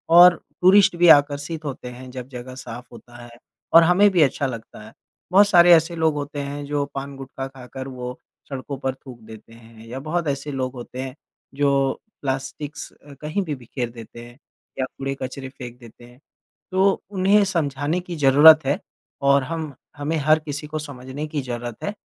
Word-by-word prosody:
और 175 0 +9 0.3
टूरिस्ट 190 0 +6
भी 175 +1 +4
आकर्षित 145 +2 -2
होते 135 -3 -6
हैं 125 +1 -10
जब 125 -1 -7
जगह 130 0 -9
साफ 120 -1 -8
होता 120 +1 -15
है 120 - -12 0.4
और 165 - +9
हमें 180 +5 +5
भी 175 - +3
अच्छा 140 -1 +2
लगता 115 -3 -8
है। 110 - -14 0.4
बहुत 200 +2 +6
सारे 175 -2 +7
ऐसे 165 +1 +3
लोग 160 -1 +2
होते 145 0 -5
हैं, 145 +1 -5
जो 145 0 -1
पान-गुटखा 135 -1 -6
खाकर 130 0 -9
वो 125 -1 -7 0.3
सड़कों 135 +1 -6
पर 130 -1 -2
थूक 130 -3 -13
देते 110 0 -13
हैं 115 -1 -16
या 130 +3 -6
बहुत 160 +3 -2
ऐसे 140 +1 -3
लोग 130 -1 -3
होते 125 +1 -9
हैं 130 0 -6 0.4
जो 145 0 +2 0.5
प्लास्टिक्स 140 +3 -4 0.3
कहीं 155 +7 -2
भी 150 -4 -3
बिखेर 120 0 -5
देते 120 0 -11
हैं 120 +2 -15 0.4
या 130 - +1
कूड़े-कचरे 135 -1 -5
फेंक 125 -2 -10
देते 120 0 -15
हैं। 120 +1 -18 0.5
तो 190 +1 +2
उन्हें 200 +1 +3
समझाने 155 -2 -1
की 175 -1 -7
ज़रूरत 150 +1 +7
है 140 +2 0 0.4
और 140 0 +4
हम 160 -1 -5 0.2
हमें 150 +3 -2
हर 155 +2 +3
किसी 150 -1 -6
को 155 0 -4
समझने 140 0 -7
की 150 -2 -3
ज़रूरत 120 -2 -6
है 205 - -2
140 Hz, 180 wpm, -22 LUFS, 130-155 Hz, 0.5 s, और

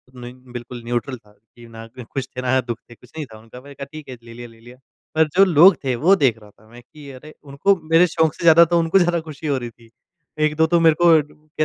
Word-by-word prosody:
नहीं, 125 0 -10 0.2
बिल्कुल 120 0 -9
न्यूट्रल 120 +2 -4
था 105 -2 -25
कि 115 +3 -20
ना 115 0 -12
ख़ुश 130 +2 -6
थे, 125 - -4
ना 130 +1 0
दुःख 120 -1 -6
थे, 120 - -14
कुछ 125 +2 -22
नहीं 150 - -5
था - - -12
उनका 115 +3 -15
मैंने 140 +1 -14
कहा 140 - -8
ठीक 155 -3 -11
है, 125 - -9
ले 115 0 -13
लिया, 120 0 -10
ले 115 -1 -20
लिया। 120 +2 -16 0.4
पर 160 -1 +3
जो 195 +1 +6
लोग 175 +1 +5
थे 130 -2 -1
वो 175 +11 +3
देख 130 - +1
रहा 105 - -16
था 110 +2 -26
मैं 120 +1 -15
कि 145 +3 -15
अरे! 150 +4 -14
उनको 145 +8 0 0.2
मेरे 170 +2 +5
शौक़ 160 -2 0
से - - -10
ज़्यादा 170 0 +6
तो 170 - +4
उनको 165 +3 +2
ज़्यादा 175 -1 0
ख़ुशी 155 -1 -9
हो 140 -2 0
रही 120 -2 -6
थी। 115 0 -22 0.5
1-2 155 +1 +1
तो 170 - +3
मेरे 160 -2 +4
को - - +4 0.3
कह 155 0 -6
135 Hz, 265 wpm, -20 LUFS, 120-160 Hz, 0.5 s, जो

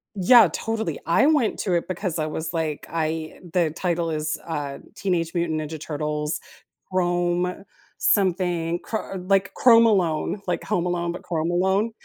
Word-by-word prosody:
Yeah, 215 +3 +7
totally. 220 -8 -2
I 170 +11 +4
went 295 -8 +2
to 185 - -1
it 170 - -1
because 180 -2 -3
I 155 - 0
was 160 +2 -4
like, 160 -3 -2
I 160 -1 -3
the 170 -4 +2
title 170 -2 -1
is, 155 0 -2
uh, 145 -4 -4 0.2
Teenage 175 -4 -1
Mutant 170 -3 0
Ninja 155 0 -6
Turtles 150 0 -3 0.5
Chrome, 175 +1 0 0.3
something 175 -3 +1
chr 215 -3 -4
like 195 +2 +1
Chrome 230 -2 +6
Alone, 190 -2 +1
like 175 - -1
Home 180 -4 0
Alone, 175 -1 -1
but 175 - -8
Chrome 165 -1 -1
Alone 190 +5 +1
175 Hz, 155 wpm, -24 LUFS, 160-190 Hz, 0.5 s, Yeah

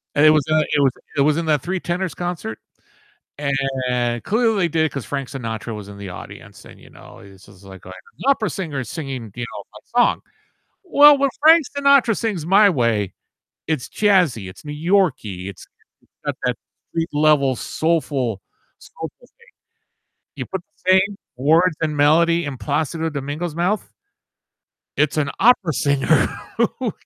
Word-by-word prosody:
And 145 - +5
it - - +9
was 155 -2 +4
in, 155 - +3
uh, 155 - +4
it - - +3
was 135 - +4 0.3
it 140 - +3
was 150 +2 +3
in 170 - -1
the 155 -2 +3
Three 185 +7 -3
Tenors 180 0 -3
concert, 175 -11 -5 0.8
and 130 -4 -1
clearly 225 0 +1
they - - +2
did 160 0 +1
it 155 - -2
'cause 140 -4 -5
Frank 140 -2 -4
Sinatra 115 -3 -5
was 105 -1 -9
in 100 - -10
the 100 -2 -7
audience - - -11
and, - - -15
you - - -17
know, - - -15
this 95 -1 -16
was, 100 -1 -18
like, 95 -2 -13
an 95 - -9 0.4
opera 255 -6 +2
singer 155 -8 -4
singing, 130 - -6
you 120 - -4
know, 125 - -9
my - - -12 0.2
song. - - +1 0.6
Well, 295 -4 +7
when 275 0 +2
Frank 320 +1 +7
Sinatra 280 -5 +4
sings 205 -9 -2
"My 200 +3 +6
Way," 115 - 0 0.5
it's 155 -6 -2
jazzy, 180 - +2
it's 90 - -16
New 150 - -6 0.2
Yorkie, 125 - +1
it's 100 - -11 0.6
got - - -2
that - - +1 0.3
street 165 0 -2
level 145 -3 +3
soulful 140 - -1 0.4
soulful - - -8 0.2
thing. - - -26 0.9
You 130 -3 -5
put 190 -2 -5 0.2
the 185 - +2
same 195 +2 +3 0.2
words 160 +6 +3
and 150 -2 -1
melody 165 +4 +3
in 135 -2 -5
Plácido 160 +7 -2
Domingo's 145 +4 -4
mouth 180 +6 -1 1.1
it's 150 +1 +1
an 145 -2 +1
opera 205 -9 +4
singer 140 -1 +2 0.3
who - - 0
150 Hz, 170 wpm, -21 LUFS, 125-180 Hz, 1.1 s, it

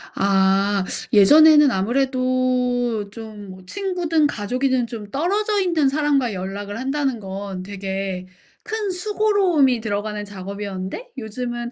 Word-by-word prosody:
아. 195 0 +2 0.3
예전에는 295 +7 +7
아무래도 250 -1 0
좀 205 -4 -10
친구든 340 - 0
가족이든 250 +2 -1
좀 215 -3 -8
떨어져 405 - 0
있는 330 -7 +2
사람과 280 -5 +1
연락을 200 +3 -5
한다는 270 -2 -1
건 195 -1 -6
되게 195 -1 -4 0.4
큰 435 -2 -3
수고로움이 365 - +2
들어가는 210 0 -3
작업이었는데 200 - -6
요즘은 240 +1 -5
240 Hz, 275 characters per minute, -21 LUFS, 200-295 Hz, 0.4 s, 예전에는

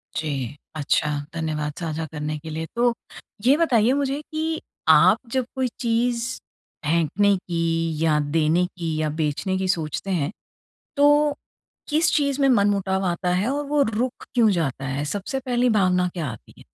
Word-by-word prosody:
जी, 140 -4 -3 0.2
अच्छा, 150 0 +1 0.2
धन्यवाद 155 -2 -2
साझा 160 -2 -3
करने 150 0 -3
के 160 +2 -9
लिए। 160 +1 -4
तो 240 0 +3 0.5
ये 265 +3 +6
बताइए 255 -7 +3
मुझे 280 +1 -1
कि 315 +1 -3 0.3
आप - - +7
जब 260 -2 0
कोई 260 -1 +1
चीज़ 235 0 +1 0.6
फेंकने 170 +6 +2
की 165 -2 -1
या 155 -2 +3
देने 165 +3 +3
की 170 -3 -4
या 155 - 0
बेचने 160 +5 -1
की 190 0 -1
सोचते 170 +1 -2
हैं, 165 -2 0 0.7
तो 290 0 +4 0.5
किस 315 +3 +2
चीज़ 280 -2 0
में 275 - +4
मनमुटाव 200 -4 +2
आता 175 +1 -1
है 195 +5 +1
और 290 +1 -2
वो 290 0 +2
रुक 240 0 -2
क्यों 230 -3 +5
जाता 140 -7 -1
है? 135 +2 -2
सबसे 200 - -3
पहली 245 0 +2
भावना 185 -4 +2
क्या 170 -4 -3
आती 115 - -12
है? - - -15
185 Hz, 160 wpm, -23 LUFS, 160-245 Hz, 0.7 s, आप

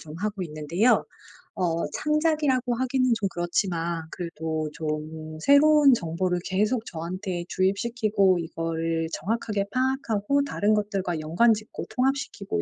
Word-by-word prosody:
좀 155 0 -10
하고 210 -1 -3
있는데요. 165 +8 +1 0.5
어 170 -3 0
창작이라고 300 -5 +1
하기는 255 0 +1
좀 205 -3 -1
그렇지만 170 -1 -1
그래도 160 -3 -4
좀 155 0 -5
새로운 285 - +6
정보를 180 -2 -1
계속 215 +5 0
저한테 175 +2 -4
주입시키고 200 -1 +1
이거를 165 0 -2
정확하게 215 -1 -1
파악하고 260 -1 0
다른 215 -6 +1
것들과 195 -5 -1
연관 175 +10 +4
짓고 215 0 -6
통합시키고 255 - -1
195 Hz, 315 characters per minute, -26 LUFS, 165-240 Hz, 0.5 s, 새로운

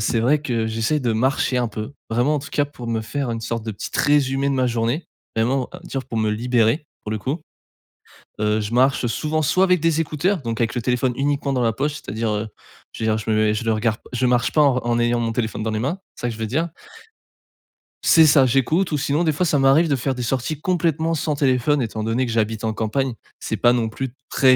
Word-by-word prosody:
c'est 110 +1 +1
vrai 140 +5 +3
que 115 -5 -1
j'essaie 115 +7 0
de 120 -4 0
marcher 130 +2 +1
un 120 - 0
peu, 110 +4 -6 0.2
vraiment 120 +6 +2
en - - -2
tout 140 - -10
cas 145 - +1
pour 135 -4 -10
me 115 -1 0
faire 125 +3 -3
une 115 -1 -3
sorte 115 0 -3
de 110 - -3
petite 100 - -5
résumé 140 -1 +2
de 140 - +1
ma 130 -1 +2
journée, 120 +6 -1 0.3
vraiment 125 +3 +1
à 180 - -8
me - - -13
dire 135 -1 -4
pour 115 - -4
me 110 -1 +1
libérer 120 +5 +1 0.2
pour 105 - -5
le 110 - -1
coup, 140 +9 -3 1.0
heu, 105 0 +2
je 105 +2 -4
marche, 130 +1 +3
heu, - - +1
souvent 155 +6 -1
soit 185 +6 +3
avec 180 -2 +3
des 165 0 +2
écouteurs 165 +3 0
donc 115 0 -3
avec 115 - 0
le 120 - -2
téléphone 125 +1 +1
uniquement 140 0 0
dans 125 - +1
la 115 -2 +1
poche. 145 +4 -1
C'est-à-dire, 110 -4 -3
heu, 105 +1 -2 0.4
je - - -8
veux - - +1
dire, 110 - +1
je 110 +1 -4
me 110 - +2
mets 110 0 +3
je 110 - -3
le 115 - +2
regarde 110 0 0
p - - -42
je 125 +1 0
marche 125 -1 +2
pas 150 - +4
en 140 -3 +4
re 125 - -3
en 120 0 +1
ayant 120 0 +2
mon 115 -1 -1
téléphone 110 -2 -2
dans 110 - -1
les 110 - -2
mains, 140 - -2 0.2
c'est - - -12
ça 120 - 0
que - - -5
je - - -12
veux 110 - -2
dire. 155 +10 -1 1.4
C'est 160 -1 +7
ça, 140 -3 +6
j'écoute 155 +9 +1
ou 150 - +1
sinon 145 +4 0
des 160 - +2
fois 180 +5 0
ça 150 -3 +2
m'arrive 135 +5 +5
de 140 - +2
faire 130 +1 -2
des 125 - -4
sorties 135 +5 -2
complètement 165 -2 0
sans 150 -1 -1
téléphone, 135 0 +2
étant 110 -1 -4
donné 115 +4 0
que 120 - -4
j'habite 110 0 -1
en 110 -1 0
campagne. 120 +4 -1 0.3
C'est - - -3
pas 120 0 +4
non 115 -2 0
plus 130 +3 -4 0.2
très 130 -1 +4
125 Hz, 260 wpm, -22 LUFS, 115-145 Hz, 1.4 s, C'est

